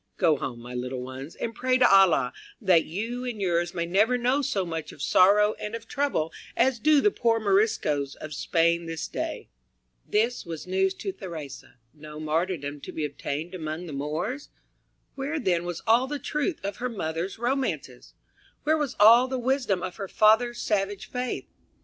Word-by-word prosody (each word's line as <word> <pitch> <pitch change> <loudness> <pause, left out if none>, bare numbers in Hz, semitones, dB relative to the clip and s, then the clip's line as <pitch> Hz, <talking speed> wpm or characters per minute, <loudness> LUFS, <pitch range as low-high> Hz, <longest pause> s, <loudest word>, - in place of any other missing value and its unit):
Go 160 - +4
home, 120 -2 -5
my 120 +1 -9
little 125 +1 -4
ones, 130 +4 -8
and 230 - -4
pray 255 +1 +1
to 250 -1 +6
Allah 195 -4 +5 0.3
that 185 -7 +4
you 225 +9 -4
and 245 -4 -4
yours 175 -2 0
may 170 -1 -1
never 210 +8 +3
know 250 +4 +1
so 205 -9 -1
much 160 -3 -5
of - - -15
sorrow 205 +7 +5
and 210 +2 -4
of 230 0 -8
trouble 275 - -1 0.2
as 260 -2 +3
do 300 +2 +4
the 415 - +4
poor 230 -7 +1
Moriscoes 195 -9 +1
of 155 0 -8
Spain 170 +3 +1
this 165 -1 -4
day." 320 0 -4 0.6
This 230 +4 +1
was 165 -2 -7
news 190 +1 +1
to 390 - -4
Theresa. 160 - -9 0.2
No 150 0 -10
martyrdom 155 -2 -2
to - - -7
be 155 - -2
obtained 150 +4 -5
among 160 0 -5
the 160 - -7
Moors? 160 - -3 0.6
Where 280 +3 -3
then 175 - 0
was 175 -1 -5
all 235 +4 +4
the 295 +1 -3
truth 300 +5 -2
of 200 0 -4
her 250 +1 -2
mother's 175 -3 -3
romances, 260 +3 -3 0.5
where 310 +1 +2
was 290 -4 -2
all 230 +4 +8
the 260 0 -2
wisdom 245 -7 0
of 180 -2 -5
her 195 - -4
father's 225 +5 +3
savage 195 -1 -1
faith? 250 0 -3
195 Hz, 180 wpm, -26 LUFS, 160-245 Hz, 0.6 s, all